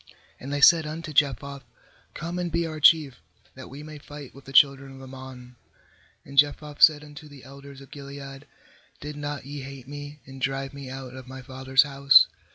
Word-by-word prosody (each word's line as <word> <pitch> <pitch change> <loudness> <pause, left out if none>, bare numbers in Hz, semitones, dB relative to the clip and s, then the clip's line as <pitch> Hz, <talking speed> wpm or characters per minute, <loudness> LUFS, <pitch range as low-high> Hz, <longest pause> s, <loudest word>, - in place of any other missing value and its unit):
6And 135 - -7
they 145 0 -2
said 160 +1 +6
unto 155 0 -6
Jephthah: 140 -1 0 0.5
'Come 170 +2 -5
and 175 -1 -3
be 170 +1 0
our 155 -1 -6
chief, 150 - +4 0.3
that 130 - -11
we 140 +3 -10
may 155 -1 -10
fight 145 -2 -11
with 140 0 -15
the 135 - -10
children 135 -1 +4
of 135 - -12
Ammon.' 130 -2 -11 0.7
7And 140 +1 -12
Jephthah 145 +1 +2
said 150 -2 +6
unto 150 +1 -12
the 145 -3 -14
elders 140 +1 -13
of 135 - -15
Gilead: 140 0 -10 0.5
'Did 150 0 -7
not 145 -2 -5
ye 145 0 -7
hate 135 -1 -10
me, 145 +1 -9
and 135 0 -12
drive 135 +1 -2
me 140 -2 -9
out 130 -1 -8
of 130 -1 -11
my 130 0 -9
father's 130 +1 +2
house? 140 -1 +6
140 Hz, 190 wpm, -25 LUFS, 135-145 Hz, 0.7 s, said